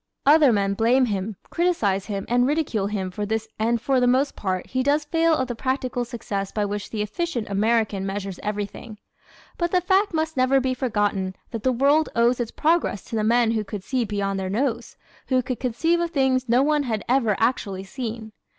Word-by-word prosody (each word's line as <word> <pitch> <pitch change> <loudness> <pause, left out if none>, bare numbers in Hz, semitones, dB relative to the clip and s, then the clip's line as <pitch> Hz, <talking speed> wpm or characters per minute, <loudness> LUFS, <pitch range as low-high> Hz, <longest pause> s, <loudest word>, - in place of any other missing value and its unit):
Other 295 -1 +6
men 200 -2 +1
blame 240 +5 +3
him, 205 -1 -3 0.2
criticise 220 - +1
him 200 -2 -3
and 245 +1 +2
ridicule 275 -9 0
him 195 -3 -3
for 205 +3 -4
this 220 +1 -2
and 230 +2 +1
for 265 +2 +1
the 250 - +3
most 260 +3 +2
part 185 -2 -2
he 255 - -2
does 290 +3 +1
fail 325 +1 +2
of 260 - -1
the 245 - -3
practical 255 0 -2
success 215 -5 -4
by 210 -1 -1
which 205 0 -4
the 215 -2 -2
efficient 240 - -3
American 215 -1 +1
measures 195 -1 -4
everything. 210 +1 -5 0.6
But 345 0 +1
the 365 - +3
fact 380 +3 +2
must 320 -1 -1
never 260 +1 +3
be 260 0 0
forgotten 205 -7 -1 0.2
that 230 - -4
the 260 - +2
world 280 +5 +3
owes 235 +2 +3
its 235 -2 -2
progress 320 - 0
to - - -6
the 215 - 0
men 230 +1 +3
who 220 -2 0
could 200 -1 -7
see 255 +3 -1
beyond 200 -2 -2
their 190 -1 -3
nose, 235 +2 -2 0.3
who 255 -1 +2
could 255 -1 -4
conceive 325 +8 +1
of 340 0 0
things 265 -5 +1
no 245 +3 +4
one 300 0 +2
had 225 -6 -3
ever 235 -5 +2
actually 205 -5 -1
seen. 225 0 -6
235 Hz, 205 wpm, -24 LUFS, 205-270 Hz, 0.6 s, Other